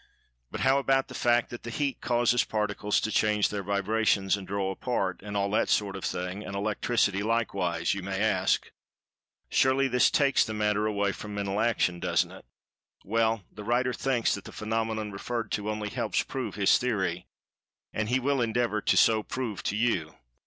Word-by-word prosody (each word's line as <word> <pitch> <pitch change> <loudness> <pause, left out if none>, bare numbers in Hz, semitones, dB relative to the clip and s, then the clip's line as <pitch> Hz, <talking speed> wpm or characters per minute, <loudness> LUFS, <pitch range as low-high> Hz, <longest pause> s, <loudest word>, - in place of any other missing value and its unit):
"But, - - -5
how 135 +1 +4
about 135 0 +1
the - - -8
fact 120 0 +2
that 120 - -8
Heat 135 +4 -2
causes 120 0 +2
the - - -4
Particles 105 -1 0
to 110 - -2
change 105 -2 +2
their 105 -1 -3
vibrations, 100 0 +1
and 100 -2 -8
draw 95 -1 -1
apart, 95 -3 -2
and 100 0 -4
all 100 0 0
that 105 - +1
sort 100 -2 +1
of 95 - -7
thing—and 90 +3 -4
Electricity, 105 0 0
likewise?" 100 -6 0
you 100 - -4
may 95 +1 -3
ask. 110 0 +1 0.8
"Surely 130 +1 +3
this 125 -1 +4
takes 140 -2 +3
the 110 - -5
matter 105 0 +1
away 100 -1 0
from 105 +1 -7
Mental 100 0 -2
Action, 110 -6 +1
doesn't - - +1
it?" - - -13 0.6
Well, 115 0 +1
the 105 - -9
writer 125 +3 +1
thinks 125 -2 +1
that 100 - -5
the - - -9
phenomenon 110 -1 -2
referred 115 +3 -4
to 105 0 -2
only 105 -1 -3
helps 115 -3 -3
to - - -8
prove 125 -7 -4
his 100 -2 +4
theory. 95 -8 -1 0.7
And 110 0 -2
he 130 +2 +2
will 135 0 +1
endeavor 115 -2 0
to - - +2
so 110 -1 +5
prove 110 -4 -4
to 105 - -2
you. 100 -9 0
105 Hz, 185 wpm, -28 LUFS, 100-120 Hz, 0.8 s, so